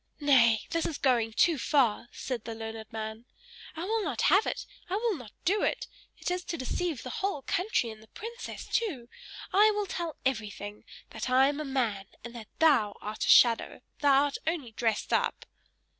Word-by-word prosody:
"Nay, 235 -7 +4
this 330 -1 0
is 305 - -4
going 240 -4 +2
too 310 +6 +3
far!" 240 -5 +2
said 245 -4 -5
the 225 -1 -6
learned 220 0 -7
man. 220 +1 -6 0.5
"I 325 - -4
will 440 +3 0
not 285 - -2
have 395 +3 +4
it; - - -3 0.2
I 370 - 0
will 445 0 0
not 245 -8 -10
do 405 +4 +2
it! - - 0 0.3
It - - -3
is 360 0 -2
to 335 - -3
deceive 310 +2 -2
the - - -6
whole 385 -8 -1
country 360 - 0
and 215 0 -12
the 220 - -17
princess 470 - -8
too! 300 - -2 0.4
I 415 +3 +6
will 415 -1 0
tell 340 -4 -4
everything! 210 -4 -3 0.3
That - - -4
I 260 +2 +5
am 290 +1 -3
a 305 - -3
man, 235 -8 -1 0.2
and 235 0 -8
that 230 -3 -9
thou 260 -11 +4
art 210 +1 -4
a - - -2
shadow 235 -2 +5 0.2
thou 280 -1 +5
art 285 -1 -2
only 310 -8 -2
dressed 220 -1 -1
up!" - - 0
265 Hz, 190 wpm, -29 LUFS, 225-340 Hz, 0.5 s, I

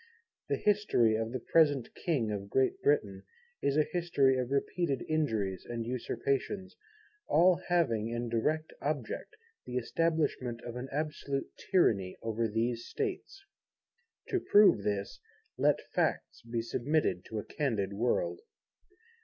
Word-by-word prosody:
The - - +1
history 205 - +3
of 110 +1 -2
the 130 - -3
present 145 -2 +2
King 130 -11 -1
of 100 -1 -4
Great 130 +3 +1
Britain 100 -10 +1 0.4
is 140 +1 +1
a 155 - +5
history 155 -7 +3
of 125 -1 -1
repeated 140 +1 -1
injuries 110 - 0
and 115 -1 -3
usurpations, 140 - -2 0.5
all 180 +1 +4
having 125 -12 +1
in 120 +1 -3
direct 150 +8 -1
object 145 - -3 0.3
the 125 - -5
establishment 145 -3 0
of 120 -1 -6
an 125 +2 -5
absolute 145 -1 -3 0.2
Tyranny 100 - +2
over 115 0 0
these 115 +2 -1
States. 395 -1 -4 0.9
To 380 - +1
prove 205 - +5
this, 100 -1 -2 0.4
let - - +3
Facts - - -1
be 115 -1 0
submitted 125 - 0
to 110 - -6
a 105 - -4
candid 110 -9 -1
world. 120 - 0
130 Hz, 130 wpm, -31 LUFS, 115-155 Hz, 0.9 s, a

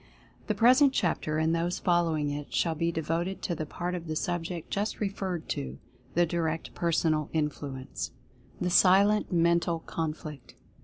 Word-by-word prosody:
The - - 0
present 260 +4 +6
chapter, 155 -6 0
and 160 +1 +2
those 170 +2 0
following 165 -5 +1
it, 145 0 -5
shall 165 - +1
be 165 +2 0
devoted 165 +4 -2
to 175 - -1
the 155 -2 -4
part 175 +3 -3
of 170 -2 -5
the 155 - -2
subject 175 0 -3
just 205 +2 -1
referred 190 -4 -3
to 65 0 -3 0.2
— - - -30
the 175 +1 +5
Direct 165 -1 -2
Personal 160 -3 +1
Influ 145 -3 -2
ence. 130 - -5 0.5
THE 180 - 0
SILENT 200 +4 +5
MENTAL 170 -1 +2
CONFLICT. 155 -3 -5
170 Hz, 160 wpm, -29 LUFS, 155-180 Hz, 0.5 s, present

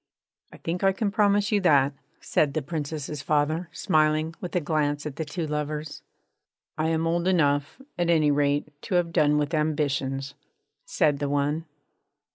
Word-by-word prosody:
'I - - -12
think 175 +3 -4
I 195 0 +4
can 200 +1 -1
promise 205 -1 +2
you 205 -1 +2
that,' 145 -6 +4 0.3
said 145 -2 0
the 155 - -1
Princess's 150 -1 -4
father, 155 +4 0
smiling, 155 -1 +1
with 180 - -6
a - - +4
glance 150 -2 -1
at 150 -1 -6
the 160 - -1
two 160 +3 -4
lovers. 150 0 -4 0.8
'I 155 - +1
am 165 0 0
old 170 +2 0
enough, 145 - +1 0.2
at 175 -1 +1
any 155 -3 +4
rate, 145 +1 +1
to 185 - -3
have 170 -1 +1
done 150 -3 +3
with 150 +2 -1
ambitions,' 140 -3 -1 0.5
said 145 -2 +1
the 145 -1 -1
one. 145 +3 0
155 Hz, 165 wpm, -26 LUFS, 145-170 Hz, 0.8 s, I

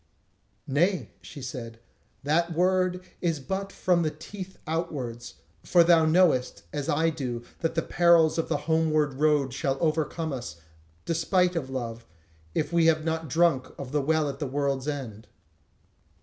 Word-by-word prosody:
"Nay," 155 - +1
she 95 +10 -10
said, 115 -3 -7 0.4
"that 170 +4 +1
word 185 +1 +1 0.2
is 165 -4 0
but 195 +7 -4
from 180 -3 +1
the 160 - +1
teeth 185 +5 -9
outwards; 140 -8 -4 0.3
for 175 -2 +5
thou 165 -1 +5
knowest, 160 -6 +3
as 145 -2 -3
I 160 +3 +2
do, 125 -6 -4 0.2
that 165 0 -1
the 165 - +1
perils 170 -2 +4
of 165 - -1
the - - +1
homeward 155 -2 +2
road 145 -4 +2
shall 135 -1 -1
overcome 160 0 -1
us, 120 -12 -6 0.5
despite 175 +2 +1
of 140 -6 -2
love, 115 -3 -5 0.5
if 155 - -1
we 165 -1 +4
have 155 -1 +2
not 160 -1 -2
drunk 155 -3 +2
of 135 -2 -7
the 145 0 +1
Well 155 +1 +1
at 140 -1 -5
the 145 - -2
World's 140 0 -1
End." 125 -8 -5
155 Hz, 155 wpm, -27 LUFS, 135-170 Hz, 0.5 s, for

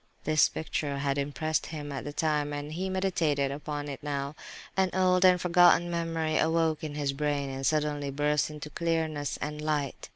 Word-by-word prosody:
This 155 0 +4
picture 145 -2 -3
had 140 0 0
impressed 155 +3 -1
him 150 -2 -6
at 135 - -5
the 145 - -4
time, 150 -1 0
and 145 +1 -5
he 185 +3 -2
meditated 165 -7 +1
upon 145 +1 -4
it 140 -2 -6
now. 140 -1 -3 0.4
An 190 -1 +2
old, 185 -1 +3 0.2
forgotten 175 0 +5
memory 165 -2 -1
awoke 160 -1 +1
in 150 -2 -4
his 145 -2 -1
brain, 145 -1 -1
and 135 0 -5
suddenly 150 0 0
burst 150 +2 +1
into 150 0 -8
clearness 160 -3 -1
and 150 +1 -4
light. 150 -3 -2
150 Hz, 170 wpm, -29 LUFS, 145-160 Hz, 0.4 s, forgotten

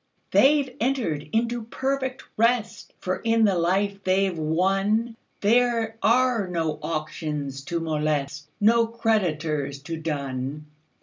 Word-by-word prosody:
"They 285 +2 +5
've 260 -2 -13
entered 220 - -1
into 235 +1 0
perfect 265 +2 -2
rest; 230 0 0
For 185 0 -2
in 225 -1 +2
the 200 - +3
life 195 +4 0
they 190 +1 +2
've - - -5
wonThere 215 +7 +1
are 240 -3 +3
no 165 -4 -2
auctions 150 -3 -4
to 170 +1 -2
molest, 150 -2 -2
No 230 +2 +4
creditors 165 - -1
to 165 +2 -4
dun. 140 -2 -4
195 Hz, 120 wpm, -25 LUFS, 155-230 Hz, -, They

